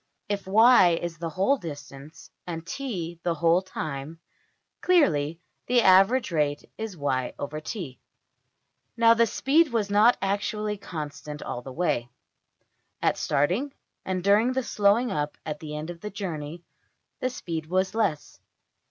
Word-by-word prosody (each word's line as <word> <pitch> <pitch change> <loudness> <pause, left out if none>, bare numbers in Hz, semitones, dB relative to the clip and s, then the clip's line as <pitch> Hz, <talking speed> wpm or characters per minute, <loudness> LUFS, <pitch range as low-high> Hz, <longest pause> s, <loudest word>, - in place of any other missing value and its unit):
If 200 -2 -3
$y$ 210 -4 +6
is 170 -2 -5
the 165 -1 -3
whole 195 - +2
distance, 145 - -10 0.2
and 165 -1 -5
$t$ 175 -9 -5
the 170 -1 -1
whole 170 +2 +3
time, 155 -4 -6 0.6
clearly 165 - +2 0.3
the 245 -1 +4
average 195 +6 +5
rate 150 -3 0
is 220 -3 -5
$\dfrac{y}{t}$. 145 - -4 1.0
Now 230 0 +6
the 230 0 +3
speed 295 +7 +2
was 215 -3 -1
not 215 +4 +5
actually 210 +2 -2
constant 150 -3 -7
all 120 - -5
the 130 - -9
way: 125 -6 -1 0.9
at - - +2
starting, 200 - 0 0.3
and 185 -1 -3
during 210 +6 +4
the 260 0 -1
slowing 215 +3 +2
up 150 0 -2
at 150 -1 -4
the 150 -1 -7
end 155 +3 -5
of 170 - -12
the 210 - -5
journey, 170 -5 -6 0.6
the 255 - 0
speed 165 -10 -5
was 185 +2 0
less. 200 -10 -1
180 Hz, 140 wpm, -26 LUFS, 150-215 Hz, 1.0 s, $y$